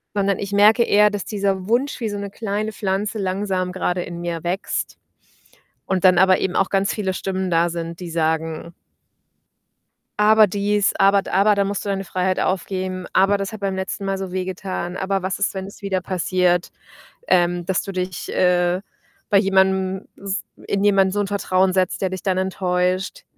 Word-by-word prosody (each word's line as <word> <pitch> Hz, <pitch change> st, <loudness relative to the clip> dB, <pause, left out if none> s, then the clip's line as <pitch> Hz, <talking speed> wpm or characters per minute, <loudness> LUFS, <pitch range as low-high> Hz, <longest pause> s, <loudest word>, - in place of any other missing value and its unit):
sondern 200 Hz, -1 st, +1 dB
ich 200 Hz, 0 st, -5 dB
merke 210 Hz, +3 st, +5 dB
eher, 210 Hz, -1 st, +4 dB
dass 205 Hz, -2 st, -4 dB
dieser 195 Hz, -3 st, -1 dB
Wunsch 250 Hz, +5 st, 0 dB
wie 230 Hz, -, -2 dB
so 205 Hz, -, -4 dB
'ne 200 Hz, 0 st, -5 dB
kleine 215 Hz, +1 st, -3 dB
Pflanze 205 Hz, +2 st, -2 dB
langsam 190 Hz, -2 st, -1 dB
gerade 180 Hz, -1 st, -1 dB
in 170 Hz, -1 st, -7 dB
mir 170 Hz, -1 st, -4 dB
wächst, 180 Hz, +3 st, -3 dB, 0.9 s
und 190 Hz, -1 st, -1 dB
dann 185 Hz, -1 st, +6 dB
aber 190 Hz, 0 st, +5 dB
eben 185 Hz, -, -2 dB
auch 195 Hz, -, +2 dB
ganz 195 Hz, 0 st, +1 dB
viele 190 Hz, -3 st, -2 dB
Stimmen 190 Hz, -1 st, -2 dB
da 170 Hz, 0 st, +2 dB
sind, 170 Hz, 0 st, -5 dB
die 175 Hz, -2 st, -7 dB
sagen: 160 Hz, +1 st, -2 dB, 1.5 s
„Aber 215 Hz, +1 st, +6 dB
dies, 205 Hz, +1 st, +1 dB
aber 195 Hz, 0 st, +4 dB
da -, -, -8 dB
aber, 200 Hz, +2 st, +4 dB
da 200 Hz, -, +2 dB
musst 200 Hz, +1 st, -3 dB
du -, -, -2 dB
deine 195 Hz, -1 st, -1 dB
Freiheit 185 Hz, 0 st, -1 dB
aufgeben, 185 Hz, -1 st, -2 dB
aber 195 Hz, +2 st, +4 dB
das 195 Hz, +1 st, -4 dB
hat 215 Hz, -2 st, -9 dB
beim 195 Hz, -1 st, -1 dB
letzten 190 Hz, +1 st, -4 dB
Mal 195 Hz, 0 st, -1 dB
so 190 Hz, -2 st, -5 dB
wehgetan. 185 Hz, -1 st, -4 dB
Aber 195 Hz, 0 st, -1 dB
was 190 Hz, +1 st, -2 dB
ist, -, -, 0 dB
wenn 190 Hz, 0 st, -4 dB
es 200 Hz, -, -12 dB
wieder 190 Hz, -2 st, -1 dB
passiert, 180 Hz, -1 st, 0 dB, 0.6 s
ähm, 175 Hz, -1 st, +2 dB
dass 190 Hz, -1 st, 0 dB
du 195 Hz, -, -6 dB
dich, 185 Hz, -2 st, -4 dB
äh, 180 Hz, 0 st, +2 dB, 0.5 s
bei 205 Hz, -, +3 dB
jemandem 190 Hz, -1 st, +1 dB
s 195 Hz, 0 st, -3 dB, 0.2 s
in 200 Hz, -, -1 dB
jemanden 195 Hz, -2 st, +4 dB
so 205 Hz, -, 0 dB
'n 205 Hz, -, 0 dB
Vertrauen 190 Hz, -2 st, +1 dB
setzt, 185 Hz, -1 st, 0 dB
der 190 Hz, -, +1 dB
dich 185 Hz, 0 st, -5 dB
dann 190 Hz, -2 st, 0 dB
enttäuscht.” 185 Hz, 0 st, -1 dB
190 Hz, 185 wpm, -21 LUFS, 185-200 Hz, 1.5 s, dann